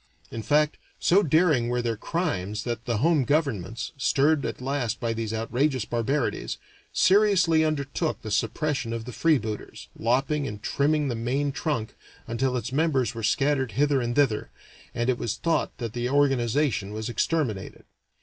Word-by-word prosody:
In 115 - -4
fact, 150 +7 +2 0.2
so 190 +4 +4
daring 155 -7 +3
were 125 0 0
their 115 -1 0
crimes 105 - -2
that 120 0 -4
the 120 -4 0
home 155 +3 +3
governments, 120 - -1
stirred 140 +2 +2
at - - -5
last 130 -3 -2
by 115 -1 -1
these 115 -1 -3
outrageous 125 +3 0
barbarities, 120 +4 -1 0.3
seriously 185 -5 +4
undertook 155 +1 -1
the 110 - -5
suppression 130 +3 -1
of 115 -1 -4
the 125 - -6
freebooters, 115 -8 -1
lopping 135 +5 0
and 105 -2 -7
trimming 150 +1 +1
the 125 - -1
main 130 +5 -1
trunk 135 -6 -2 0.3
until 125 +2 -1
its 125 - -4
members 135 -6 +1
were 115 - -6
scattered 135 +2 +1
hither 145 -1 +2
and 120 0 -2
thither, 135 -7 +2 0.5
and 120 0 0
it 130 -2 +1
was 115 -1 -2
thought 165 -1 -1
that 115 -3 -5
the 120 0 -2
organization 135 -5 +1
was 110 +1 -4
exterminated. 120 - -2
130 Hz, 160 wpm, -26 LUFS, 115-150 Hz, 0.5 s, so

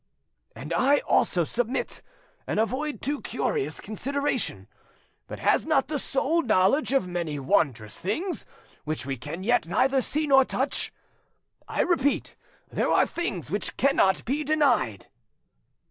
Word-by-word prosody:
'" - - -45
"And - - -6
I 280 +3 +4
also 175 - +2
submit, 245 - -2 0.5
and - - -1
avoid 265 +7 -1
too 290 +1 -1
curious 430 -4 -2
consideration. 280 +7 -2 0.6
But - - -7
has - - +2
not 290 -4 +2
the 300 -2 -1
soul 295 +6 +1
knowledge 220 - +2
of 270 -9 +2
many 170 -4 -3
wondrous 135 - 0
things 325 - -3 0.4
which 155 -3 -3
we 135 0 -2
can 150 +8 -7
yet 240 -4 +2
neither 260 +9 +2
see 305 +4 -1
nor 270 -2 +6
touch? 265 +2 -1 0.8
I - - 0
repeat, 285 -6 +1 0.3
there - - -1
are - - +4
things 200 - -4
which 205 - -2
cannot 265 -9 +3
be 285 +5 -1
denied." 260 - +1
255 Hz, 140 wpm, -26 LUFS, 180-285 Hz, 0.8 s, nor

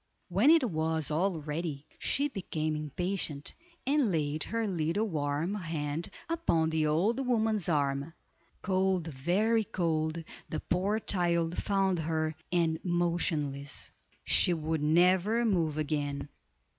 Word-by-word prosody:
When 200 +10 +4
it 320 -5 +6
was 160 -4 -1
all 170 +1 0
ready, 150 -1 -4
she 285 +1 +1
became 155 - -3
impatient, 150 0 -3 0.3
and 275 -5 +2
laid 155 -2 0
her 230 0 -1
little 185 +3 0
warm 150 +1 -1
hand 160 -4 -3 0.2
upon 170 - +1
the 160 -1 +1
old 200 - +1
woman's 220 -6 +2
arm. 140 0 0 0.5
Cold, 190 -2 +1
very 205 +12 +2
cold, 165 -3 -1 0.3
the 155 - -2
poor 195 +5 0
child 170 -4 +1
found 195 -3 +1
her, 160 0 -1 0.2
and 165 -2 +1
motionless. 165 -5 -1 0.3
She 175 - +4
would 160 -1 -2
never 180 +9 +3
move 165 -8 +1
again. 145 -2 -2
170 Hz, 120 wpm, -30 LUFS, 155-195 Hz, 0.5 s, it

